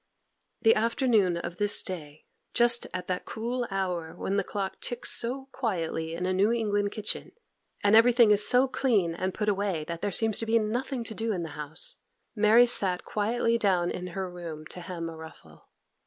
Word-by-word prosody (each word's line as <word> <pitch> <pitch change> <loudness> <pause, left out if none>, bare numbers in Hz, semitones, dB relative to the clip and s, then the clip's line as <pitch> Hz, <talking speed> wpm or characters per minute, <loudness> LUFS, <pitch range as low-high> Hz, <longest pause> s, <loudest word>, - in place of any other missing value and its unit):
The 225 -1 +7
afternoon 220 -5 +2
of 170 0 -6
this 205 0 +3
day, 155 -5 -8 0.3
just 240 0 +5
at 180 -1 -5
that 180 0 -3
cool 240 +2 -3
hour 180 -4 -3
when 195 - -2
the 200 - +1
clock 195 -2 -4
ticks 245 0 -1
so 265 +3 -2
quietly 165 -8 -2
in 180 +2 -3
a 185 - 0
New 200 +4 +3
England 205 -3 0
kitchen, 215 -2 -2 0.5
and 205 +1 +5
everything 235 -1 +6
is 210 0 +4
so 250 +4 +4
clean 215 -11 +1
and 185 +3 -2
put 210 +2 -3
away 195 -5 0
that 170 +1 -6
there 205 - -1
seems 220 +2 +1
to 225 - -3
be 230 +1 +4
nothing 240 +4 -2
to 225 - -3
do 225 +1 -2
in 180 -4 -2
the 165 - -5
house, 150 +1 -6 0.4
Mary 220 +3 +6
sat 190 -6 +1
quietly 230 +2 0
down 180 -5 +2
in 180 - -5
her 190 -1 -2
room 170 -3 -8
to 180 - -8
hem 170 -1 -5
a 165 - -7
ruffle. 160 0 -14
205 Hz, 190 wpm, -28 LUFS, 175-230 Hz, 0.5 s, The